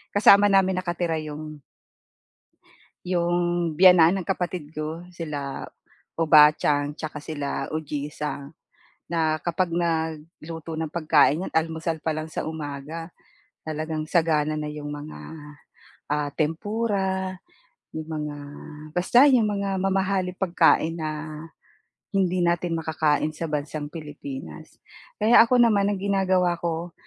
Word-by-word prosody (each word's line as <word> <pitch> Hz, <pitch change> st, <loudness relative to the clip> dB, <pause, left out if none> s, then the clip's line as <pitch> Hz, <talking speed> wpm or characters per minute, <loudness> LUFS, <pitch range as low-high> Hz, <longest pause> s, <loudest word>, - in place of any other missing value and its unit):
kasama 205 Hz, 0 st, +7 dB
namin 190 Hz, -2 st, +3 dB
nakatira 175 Hz, -2 st, -2 dB
'yong 155 Hz, 0 st, -7 dB, 1.4 s
'yung 175 Hz, -1 st, 0 dB, 0.4 s
biyenan 180 Hz, +1 st, +6 dB
ng 170 Hz, -, -11 dB
kapatid 180 Hz, -5 st, -3 dB
ko 155 Hz, +2 st, -4 dB
sila 145 Hz, -5 st, -5 dB, 0.5 s
Obaachan 150 Hz, -2 st, +4 dB
saka 155 Hz, 0 st, -6 dB
sila 145 Hz, -3 st, -3 dB
Ujisa, 150 Hz, -1 st, -4 dB, 0.6 s
na 160 Hz, -2 st, +1 dB
kapag 175 Hz, +1 st, 0 dB
nagluto 160 Hz, -1 st, -3 dB
ng 160 Hz, 0 st, -3 dB
pagkain 155 Hz, 0 st, +3 dB
'yan -, -, -8 dB
almusal 160 Hz, 0 st, -1 dB
pa 160 Hz, 0 st, -1 dB
lang 155 Hz, -, -3 dB
sa -, -, -3 dB
umaga, 155 Hz, +2 st, -6 dB, 0.6 s
talagang 155 Hz, 0 st, -3 dB
sagana 155 Hz, -3 st, +2 dB
na 150 Hz, -, -3 dB
'yong 150 Hz, -1 st, -7 dB
mga, 145 Hz, +1 st, -7 dB, 0.9 s
ah, 150 Hz, -1 st, 0 dB
tempura, 190 Hz, +2 st, -1 dB, 0.6 s
'yong 155 Hz, 0 st, -6 dB
mga 150 Hz, -1 st, -4 dB, 0.5 s
basta 185 Hz, -, +4 dB
'yong 245 Hz, -5 st, +4 dB
mga 200 Hz, -1 st, -1 dB
mamahaling 190 Hz, -1 st, 0 dB
pagkain 170 Hz, -3 st, +2 dB
na 155 Hz, -1 st, -2 dB, 1.1 s
hindi 185 Hz, -2 st, +1 dB
natin 170 Hz, 0 st, 0 dB
makakain 155 Hz, -1 st, 0 dB
sa 165 Hz, 0 st, -5 dB
bansang 150 Hz, 0 st, -3 dB
Pilipinas. 140 Hz, -, -9 dB, 0.4 s
Kaya 220 Hz, +3 st, +7 dB
ako 245 Hz, +2 st, +3 dB
naman 210 Hz, -4 st, +4 dB
ang 200 Hz, -, -2 dB
ginagawa 190 Hz, -3 st, +2 dB
ko, 170 Hz, 0 st, -3 dB
160 Hz, 115 wpm, -25 LUFS, 150-185 Hz, 1.4 s, kasama